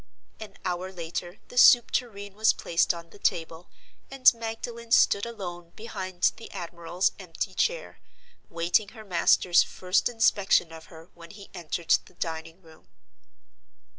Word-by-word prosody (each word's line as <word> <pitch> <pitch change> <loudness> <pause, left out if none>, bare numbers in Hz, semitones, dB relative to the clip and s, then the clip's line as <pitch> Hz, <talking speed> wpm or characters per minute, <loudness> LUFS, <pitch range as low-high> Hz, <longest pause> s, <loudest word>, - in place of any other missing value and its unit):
An 215 -1 -10
hour 180 +1 -3
later 175 +1 -6
the 245 - 0
soup 240 -1 +7
tureen 205 -5 -3
was 220 +2 +3
placed 170 0 +1
on 170 -1 -9
the 205 - -16
table; 165 -1 -2 0.4
and 270 -2 +5
Magdalen 230 +1 -7
stood 200 -1 +4
alone 175 -6 -8
behind 190 -5 -2
the 225 - -11
admiral's 175 0 -2
empty 180 -4 -5
chair, - - -2 0.5
waiting 170 +5 +1
her 220 - -11
master's 180 -1 +3
first 185 +5 0
inspection 205 -7 +2
of 160 0 -11
her 165 +1 -15
when 170 -1 -14
he 200 +1 -13
entered 170 -2 0
the 185 - -20
dining 165 +2 -6
room. 160 -1 -19
185 Hz, 140 wpm, -26 LUFS, 170-220 Hz, 0.5 s, soup